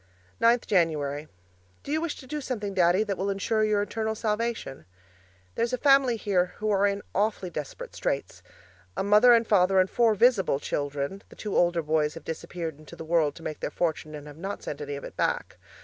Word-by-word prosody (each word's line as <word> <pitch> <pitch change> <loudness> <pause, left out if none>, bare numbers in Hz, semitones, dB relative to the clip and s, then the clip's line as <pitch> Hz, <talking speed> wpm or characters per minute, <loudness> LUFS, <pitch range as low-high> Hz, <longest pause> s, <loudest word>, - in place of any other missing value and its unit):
9th 235 +1 +4
January 155 -6 0 0.6
Do - - -6
you 310 +1 +1
wish 335 -2 -2
to - - -12
do 300 +3 -4
something, 210 -7 -4
Daddy, 180 +2 +4
that 200 -3 -3
will 195 +1 -1
ensure 215 +3 0
your 210 -1 +2
eternal 220 +2 -2
salvation? 215 - -2 0.7
There - - -3
is 235 +2 -1
a - - +1
family 275 -3 +4
here 180 -4 0
who 215 0 -1
are 200 0 +3
in 200 0 -2
awfully 200 -3 0
desperate 150 -4 -6
straits. - - -3 0.6
A - - 0
mother 210 +5 +6
and 230 0 +2
father 190 -2 +4
and 185 - +4
four 230 -3 +3
visible 210 - +3
children 145 +6 -3
the - - -14
two 210 - -5
older 175 -1 +3
boys 150 -1 +1
have - - -10
disappeared 160 -1 -5
into 155 - -12
the 160 - -8
world 160 -3 +2
to 165 - -12
make 155 - -5
their - - -3
fortune 160 -2 -2
and 145 -1 -9
have 150 0 -11
not 195 +4 -5
sent 145 - -5
any 145 -1 -4
of 140 - -8
it - - -9
back. - - -1
195 Hz, 210 wpm, -27 LUFS, 160-220 Hz, 0.7 s, mother